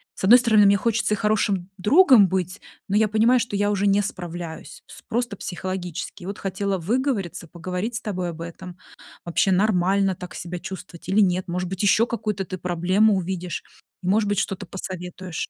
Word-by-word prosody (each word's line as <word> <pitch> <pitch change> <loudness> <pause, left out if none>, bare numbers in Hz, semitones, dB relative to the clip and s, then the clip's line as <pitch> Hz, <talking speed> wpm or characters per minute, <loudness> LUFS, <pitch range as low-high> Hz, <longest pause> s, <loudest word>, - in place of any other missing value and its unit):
С - - -9
одной 240 +5 +9
стороны, 220 -4 +4
мне 200 0 +5
хочется 230 0 0
и - - -8
хорошим 205 -4 0
другом 255 - +6
быть, 185 +1 -2 0.3
но 200 - 0
я 220 0 +4
понимаю, 230 +4 +4
что 230 -3 -3
я 205 +1 +1
уже 200 0 +1
не 200 +1 +4
справляюсь 175 -3 -7
с - - -13
просто 240 -2 -1
психологически. 180 -1 -5
И - - -8
вот 200 - -5
хотела 195 0 -2
выговориться, 210 - -2
поговорить 180 +7 -4
с - - -3
тобой 185 -5 -3
об 165 0 -10
этом, 175 +2 -9 0.5
вообще 175 +3 +1
нормально 195 -1 +2
так 180 +1 -9
себя 175 0 -6
чувствовать 185 -2 -9
или 205 +2 +4
нет? 185 -1 +1
Может 180 +1 -2
быть, 190 0 -4
ещё 215 +3 +4
какую-то 210 -4 -3
ты 185 - -6
проблему 185 +4 +2
увидишь, 180 -2 -3 0.4
может 205 +3 +2
быть, 205 - 0
что-то 195 - -3
посоветуешь. 185 -2 -6
190 Hz, 180 wpm, -23 LUFS, 180-210 Hz, 0.5 s, одной